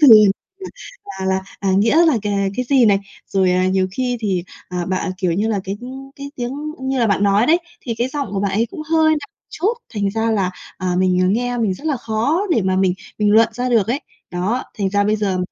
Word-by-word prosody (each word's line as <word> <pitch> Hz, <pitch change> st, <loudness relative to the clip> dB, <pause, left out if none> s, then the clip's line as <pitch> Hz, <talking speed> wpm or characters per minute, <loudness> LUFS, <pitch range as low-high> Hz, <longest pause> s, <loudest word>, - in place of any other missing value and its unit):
từ 295 Hz, -, +8 dB, 1.1 s
là 190 Hz, -, -3 dB
là, 190 Hz, 0 st, +1 dB, 0.2 s
à, 195 Hz, -1 st, +1 dB
nghĩa 265 Hz, -, +4 dB
là 275 Hz, -8 st, +3 dB
c -, -, -12 dB, 0.3 s
cái 250 Hz, -, 0 dB
gì 265 Hz, -4 st, +5 dB
này. 200 Hz, -2 st, +4 dB, 0.3 s
Rồi, 190 Hz, -2 st, +2 dB
à, 185 Hz, 0 st, +2 dB
nhiều 190 Hz, 0 st, +2 dB
khi 250 Hz, +2 st, -1 dB
thì, 190 Hz, -5 st, -1 dB, 0.2 s
à, 180 Hz, -1 st, -3 dB
bạn, 185 Hz, 0 st, -1 dB
kiểu 180 Hz, -3 st, +1 dB
như 205 Hz, +6 st, 0 dB
là, 210 Hz, -3 st, 0 dB
cái 195 Hz, +1 st, -3 dB, 0.4 s
cái 280 Hz, 0 st, -7 dB
tiếng 245 Hz, +1 st, -3 dB, 0.3 s
như 265 Hz, 0 st, -1 dB
là 235 Hz, -, +3 dB
bạn 200 Hz, -1 st, +1 dB
nói 205 Hz, +3 st, +3 dB
đấy, 335 Hz, +3 st, +5 dB, 0.2 s
thì 235 Hz, -, -4 dB
cái 245 Hz, +2 st, +1 dB
giọng 285 Hz, -1 st, -3 dB
của 195 Hz, -, -1 dB
bạn 200 Hz, -, 0 dB
ấy 225 Hz, +4 st, +1 dB
cũng 305 Hz, -, -6 dB
hơi 320 Hz, -1 st, +5 dB
nặng 310 Hz, -, +2 dB, 0.3 s
chút, 390 Hz, +8 st, 0 dB, 0.2 s
thành 200 Hz, -2 st, 0 dB
ra 225 Hz, +2 st, 0 dB
là, 195 Hz, -4 st, +1 dB, 0.3 s
à, 185 Hz, -1 st, -1 dB
mình, 185 Hz, -1 st, +2 dB
à, -, -, +3 dB
nghe 245 Hz, +3 st, 0 dB
mình 205 Hz, -5 st, +1 dB
rất 290 Hz, -, -9 dB
là 295 Hz, -4 st, +1 dB
khó 230 Hz, -, 0 dB
để 230 Hz, -, +3 dB
mà 185 Hz, 0 st, +1 dB
mình 190 Hz, -1 st, +2 dB, 0.2 s
mình 210 Hz, -1 st, +3 dB
luận 225 Hz, +1 st, +6 dB
ra 250 Hz, +2 st, -2 dB
được 230 Hz, -5 st, +3 dB
ấy. 260 Hz, +5 st, 0 dB, 0.3 s
Đó, 190 Hz, +8 st, -1 dB
thành 195 Hz, -2 st, 0 dB
ra 205 Hz, 0 st, +2 dB
bây 210 Hz, +1 st, +2 dB
giờ, 200 Hz, -3 st, -1 dB
215 Hz, 240 wpm, -19 LUFS, 190-250 Hz, 1.1 s, từ